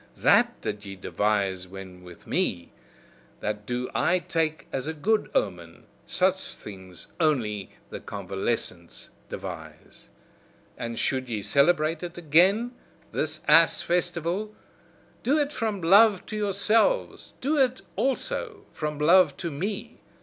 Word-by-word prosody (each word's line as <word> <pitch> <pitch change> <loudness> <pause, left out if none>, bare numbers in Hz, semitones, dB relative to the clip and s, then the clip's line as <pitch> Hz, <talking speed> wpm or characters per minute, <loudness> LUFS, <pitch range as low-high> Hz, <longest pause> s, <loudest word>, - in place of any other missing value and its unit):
THAT - - +3
did 105 0 -4
ye 100 -1 -8
devise 95 -1 -1
when 95 -1 -10
with 90 -1 -13
me, 85 - -1 0.7
that 105 0 -4
do 125 +1 -2
I 180 - +2
take 160 -3 -1
as 135 +1 -3
a 160 - -3
good 215 +8 +1
omen, 85 -4 -2 0.2
such - - 0
things 95 -3 -10
only 115 - 0 0.2
the - - -5
convalescents 95 -3 -4 0.2
devise! - - -9 0.7
And 115 0 -5
should 130 -1 -1
ye 110 -3 -3
celebrate 155 - +2
it 175 -1 -7
again, 180 +9 +4 0.4
this 155 0 -2
ass 165 +2 +6
festival, 175 +4 -1 0.7
do 280 +5 +2
it 295 -1 0
from 220 -6 -2
love 200 +3 +5
to 215 - -6
yourselves, 210 - +1
do 295 +4 0
it 260 -1 +2
also 410 - -2
from 150 -1 -3
love 175 +5 +5
to 170 -3 -4
me! 190 +8 -4
155 Hz, 130 wpm, -26 LUFS, -, 0.7 s, ass